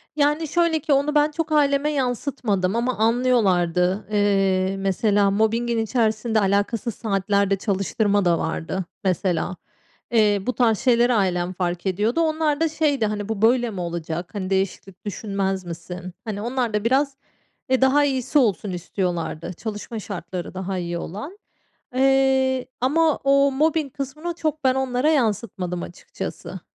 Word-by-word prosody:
Yani, 295 +2 +1
şöyle 335 0 +2
ki 290 0 0
onu 290 +2 +1
ben 295 +1 +4
çok 320 0 -3
aileme 290 0 +3
yansıtmadım 245 -7 -1
ama 245 +2 0
anlıyorlardı. 205 -6 +2
Eee, 195 -2 +2
mesela 200 +1 +2
mobbingin 230 +3 +1
içerisinde 220 -1 +1
alakasız 205 +3 0
saatlerde 200 -1 +1
çalıştırma 200 +1 0
da 170 -1 +3
vardı, 165 +3 -3 0.2
mesela. 185 -1 0 0.5
Eee, 210 -3 +4
bu 250 - +1
tarz 225 -4 +2
şeyleri 240 -1 +3
ailem 185 -4 0
fark 175 0 -3
ediyordu. 210 - +1
Onlar 310 -2 +1
da 325 - +2
şeydi, 295 -6 +1
hani, 210 0 -3
bu 220 -2 -3
böyle 240 +1 +3
mi 195 -5 -5
olacak? 170 0 -4
Hani, 185 -2 -3
değişiklik 195 0 -2
düşünmez 195 -2 -2
misin? 175 +2 -7
Hani, 210 -2 -4
onlar 240 0 -1
da 210 0 0
biraz, 270 +3 +1 0.5
e, 260 0 +2
daha 270 +2 +4
iyisi 270 +1 +1
olsun 210 -6 +1
istiyorlardı. 175 -2 -3
Çalışma 215 +3 -6
şartları 180 -3 -6
daha 190 0 -3
iyi 170 -1 -3
olan, 215 - -7 0.6
eee, 265 -1 +3 0.2
ama 310 +4 +3
o 275 0 +4
mobbing 300 0 0
kısmını 305 +5 -4
çok 310 -2 -2
ben 260 -1 +3
onlara 265 +2 +1
yansıtmadım 205 - -1
açıkçası. 175 - -7
220 Hz, 140 wpm, -23 LUFS, 190-270 Hz, 0.6 s, ben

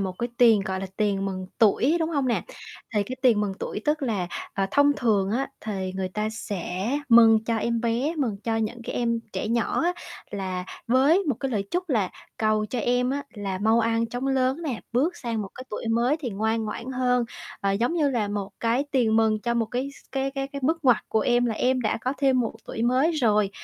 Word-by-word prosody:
một 190 -2 -1
cái 240 - -1
tiền, 230 -4 +6
gọi 190 -1 -2
là, 195 - -3
tiền 200 -2 +1
mừng 185 -1 -4
tuổi, 245 +7 +4
đúng 320 0 0
hông 280 -5 0
nè? 235 - +1 0.5
Thì 210 - +3
cái 255 +6 -6
tiền 235 -5 +5
mừng 205 -2 -1
tuổi - - -4
tức 300 0 +1
là, 210 -9 -1 0.3
ờ, 195 0 +1
thông 285 +5 +5
thường 205 -5 +1
á 255 +5 0
thì 190 -3 -3
người 190 -1 -2
ta 210 +3 -2
sẽ 195 -1 -4 0.2
mừng 225 -2 +7
cho 230 0 0
em 235 +1 0
bé, 240 +7 0
mừng 235 -8 0
cho 225 -1 0
những 225 +2 -2
cái - - -5
em 235 -1 0
trẻ - - -3
nhỏ 235 +4 +1
á 350 +1 +2 0.4
là 185 -2 -3 0.2
với 265 +8 +4
một 285 -6 +1
cái 270 - -1
lời 210 -5 -1
chúc 360 +1 -2
là 215 - +1 0.3
cầu 215 -1 +1
cho 245 - -3
em 245 +2 +1
á 285 +1 -2
là 195 -3 -3
mau 220 +3 +3
ăn 230 0 +1
chóng 245 +3 -4
lớn 265 +3 +1
nè, 265 -9 -3
bước 295 +9 +1
sang 230 -3 -3
một 195 - -6
cái 255 - -8
tuổi 225 - -4
mới 235 +5 +2
thì 255 -6 -3
ngoan 220 +2 0
ngoãn 235 +4 -5
hơn. 250 -1 +2 0.4
Ờ, 195 0 +1
giống 235 +10 0
như 300 -4 +2
là 225 -5 0
một 205 -1 -3
cái 235 +4 +1
tiền 230 -5 +2
mừng 220 -1 +3
cho 235 +1 -1
một 230 -1 +1
cái 250 +4 -2
s - - -17
cái 270 0 -1
cái 270 0 -3
cái 280 - -4
bước 320 +2 0
ngoặt 250 -4 +6
của 220 - +2
em, 245 +2 +2
là 225 - -1
em 255 +3 +1
đã 215 -3 0
có 255 +3 -1
thêm 265 -2 +3
một 230 - -1
tuổi 225 - -4
mới 255 +7 +3
rồi, 215 -9 +2
230 Hz, 235 wpm, -25 LUFS, 210-260 Hz, 0.5 s, mừng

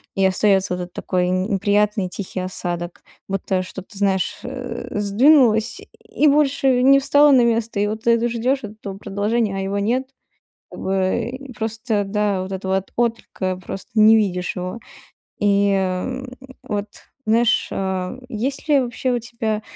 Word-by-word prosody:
и 195 - +2
остается 190 0 +2
вот 180 - -5
этот 175 0 -11
такой, 180 -1 -1
н 185 +1 +1
неприятный 205 0 +1
тихий 190 0 -5
осадок. 175 -1 -4 0.3
Будто 195 -1 -1
что, 190 +1 -7
ты 200 +1 -12
знаешь, 190 -3 0
э, 255 0 -6
сдвинулось 220 +2 +4 0.2
и 305 - +1
больше 275 -3 +3
не 275 +1 +6
встало 285 +1 +5
на 255 -3 +6
место, 230 -2 0
и - - +2
вот 215 +1 -4
ты 235 - +5
это 235 +1 +2
ждешь, 245 +4 0
вот 210 - -6
этого 195 -3 -7
продолжения, 205 +1 -1
а - - -2
его 195 +1 -2
нет. 240 +6 0 0.6
Как - - -10
бы 190 +4 0
и 265 0 -9
просто, 220 -1 -2
да, 200 -1 0
вот 190 +1 -6
этого 190 0 -2
вот 190 0 -4
отклика, 225 -5 -1
просто 195 - -7
не 215 +1 +8
видишь 180 -4 0
его. 180 +4 -5 0.6
И, 200 0 +3
м, 195 +8 -2 0.3
вот 205 -1 -3 0.4
знаешь, 230 +2 +3
а 190 +2 -3
есть 265 +6 -3
ли 290 -2 +5
вообще 255 0 -2
у 245 - 0
тебя 225 -2 -3
210 Hz, 165 wpm, -21 LUFS, 190-240 Hz, 0.6 s, не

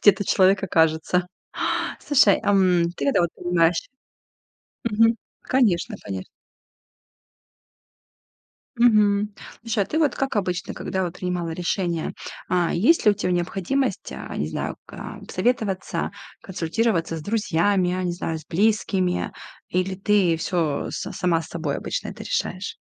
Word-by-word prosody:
где 205 - +8
этот 195 +1 -5
человек 190 0 +4
окажется. 165 +1 +2 0.7
Слушай, 265 -9 +4
ам, 185 -4 +4
ты - - -2
когда 275 - +3
вот 170 - +1
понимаешь 170 -1 +1 1.0
Мгм. 225 +1 +4 0.3
Конечно, 220 -10 +2
конечно. 95 -2 -6 2.5
Мгм. 210 -3 +4 0.3
Слушай, 225 -3 0
а - - -13
ты 315 - -1
вот 295 -5 +2
как 270 -4 -2
обычно, 180 -3 -1
когда 190 - -3
вот 175 - -4
принимала 180 -2 -2
решение, 175 0 -1 0.4
а, 175 -1 +1
есть 235 - +3
ли 210 - +7
у - - +1
тебя 185 -3 -1
необходимость, 195 - -1
а, 65 - -7
не 75 - -1
знаю, - - -3
ка - - -8
посоветоваться, 200 -2 -1 0.3
консультироваться 175 -1 -1
с 160 - -6
друзьями, 200 -2 +1
я 185 +1 -1
не 175 - 0
знаю, 165 -2 -3
с 155 - -15
близкими, 190 -1 +1 0.4
или 185 +1 0
ты 195 -4 +3
всё 160 -3 -1
с - - -4
сама 170 -2 +1
с - - -11
собой 160 -4 -3
обычно - - -4
это - - -8
решаешь? 335 - -3
185 Hz, 140 wpm, -24 LUFS, 170-210 Hz, 2.5 s, где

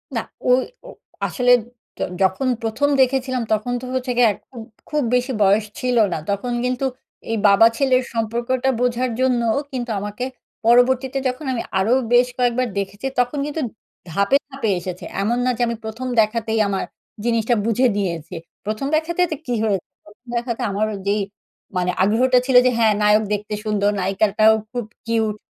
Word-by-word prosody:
না, - - +1 0.3
ঐ - - +5 0.4
ও - - -9 0.4
আসলে 250 -1 +2 0.5
য - - -6 0.2
যখন 190 +7 +2 0.2
১ম 225 +6 0
দেখেছিলাম, 260 -1 +1
তখন 215 +3 -1
তো - - -7
হচ্ছে 255 0 -1
গিয়ে 245 -1 +6
একদম 240 +5 -14 0.3
খুব 300 -1 0
বেশি 250 +2 0
বয়স 200 +2 +3
ছিল 250 -1 0 0.2
না। - - -1
তখন 200 +5 -1
কিন্তু 255 +1 -1 0.5
এই 225 - 0
বাবা 200 +3 +7
ছেলের 260 -2 +3
সম্পর্কটা 235 +3 -1
বোঝার 250 +1 +1
জন্যও 240 -3 +2
কিন্তু 250 -2 -4
আমাকে 210 +5 -4 0.4
পরবর্তীতে, 255 +3 +4
যখন 255 +4 -4
আমি 235 - -2 0.2
আরও 210 +6 +2 0.2
বেশ 245 +1 +6
কয়েকবার 250 0 +1
দেখেছি, 200 +4 -5
তখন 245 +4 +1
কিন্তু 295 +2 -3 0.5
ধাপে, 200 +10 +3
ধাপে 270 -5 -3
এসেছে। 180 0 -7 0.2
এমন 230 +4 +1
না - - +2
যে, - - -3
আমি 235 - -2
১ম 225 +4 -5
দেখাতেই 220 0 -1
আমার 195 -1 -1 0.4
জিনিসটা 230 0 +2
বুঝে 230 +3 +3
নিয়েছি। 175 -3 -3 0.3
১ম 215 +6 -2
দেখাতে 325 +3 0
তে - - 0
কী 245 - -1
হয়ে 210 -3 +2 0.3
১ম 210 +4 -20
দেখাতে 235 -1 -2
আমার 205 +2 0
ওই 200 - -5
যেই 205 +1 +2 0.6
মানে 180 0 +1
আগ্রহটা 250 +6 +3
ছিল 260 -1 0
যে, 255 - +4
হ্যাঁ, 220 -2 +4
নায়ক 210 +1 +4
দেখতে 210 +1 -3
সুন্দর, 205 -1 +1
নায়িকাটাও 205 +3 +3 0.2
খুব 245 -2 -3 0.2
কিউট। 220 -2 0
235 Hz, 165 wpm, -21 LUFS, 210-255 Hz, 0.6 s, বাবা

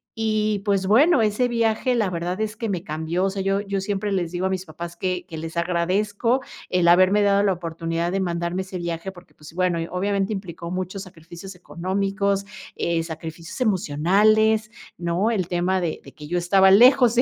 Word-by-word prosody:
y, 215 -2 0
pues, 195 -2 +1
bueno, 270 - +5
ese 215 +4 +1
viaje, 230 +1 +1
la 220 -5 +1
verdad 180 +2 -3
es 215 0 -3
que 225 - -3
me 180 -4 -3
cambió, 160 +2 -2
o - - +1
sea, 195 0 -4
yo 195 +1 +1
yo 200 -1 -3
siempre 205 +1 -2
les 175 -4 -1
digo 180 +1 -2
a - - -2
mis 190 0 -3
papás, 170 +1 -8
que 180 0 -2
que 160 - -8
les 160 +1 -7
agradezco, 200 +8 0 0.3
el 180 -2 +2
haberme 185 +4 +5
dado 200 0 +3
la 195 -2 +3
oportunidad, 165 0 -3
de 195 - -1
mandarme 175 0 -2
ese 185 0 -7
viaje, 170 +2 -4
porque, 175 -1 -17
pues, 150 +1 -14
bueno, 180 -1 0
obviamente, 200 +2 -1
implicó 170 -3 -6
muchos 185 +1 -4
sacrificios 180 +1 -11
económicos, 195 +4 -2 0.3
eh, 170 -1 0
sacrificios 165 - -8
emocionales, 215 +3 +2 0.3
¿no? 175 +6 0
El 190 -7 -1
tema 180 +1 0
de 170 -3 -3
de - - -13
que, 150 -1 -11
yo 175 - -1
estaba 190 +2 +4
lejos 245 +3 +6
de 240 - +5
190 Hz, 190 wpm, -23 LUFS, 170-205 Hz, 0.3 s, lejos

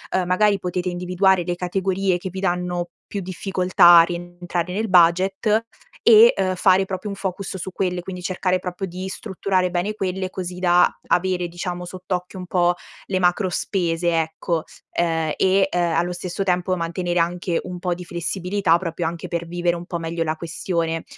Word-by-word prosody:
uhm, 185 -1 +1
magari 200 +2 +3
potete 180 0 -2
individuare 180 +1 +2
le 175 +1 -2
categorie 190 +1 0
che 185 - -5
vi 190 +1 -6
danno 175 -1 -1 0.2
più 200 - -3
difficoltà 180 -1 +4
a - - +8
rientrare 175 0 -4
nel 215 +4 -1
budget 190 +5 +3 0.4
e, 230 +1 +8
uhm, 185 -1 +1
fare 185 +1 +4
proprio 190 +2 -5
un 200 - -4
focus 190 0 -4
su 190 +1 -6
quelle. 180 -1 -1
Quindi 180 0 -7
cercare 185 0 0
proprio 180 +1 -4
di 185 +1 -6
strutturare 190 -2 -1
bene 180 +4 -1
quelle, 190 -2 -2
così 180 -1 -6
da 180 -1 +5 0.2
avere 180 0 +1
diciamo 175 +1 -5
sott'occhio 180 0 -5
un 180 - -6
po' 175 -1 +2 0.3
le 190 - -1
macro 180 +2 +2
spese 175 -2 0
ecco, 160 +1 -2 0.4
uhm, 165 -2 +1
e 190 +1 +3
uhm, 180 - +2
allo 175 +2 0
stesso 180 +2 -4
tempo 180 0 +1
mantenere 175 +1 -2
anche 175 0 0
un 180 -1 -7
po' 175 0 -1
di 180 - -8
flessibilità, 175 +1 0
proprio 170 -1 -3
anche 165 0 -5
per 170 -1 -3
vivere 175 0 0
un 170 0 -7
po' 175 - -3
meglio 165 0 -2
la 155 -1 -1
questione, 165 0 -2
180 Hz, 175 wpm, -22 LUFS, 175-190 Hz, 0.4 s, a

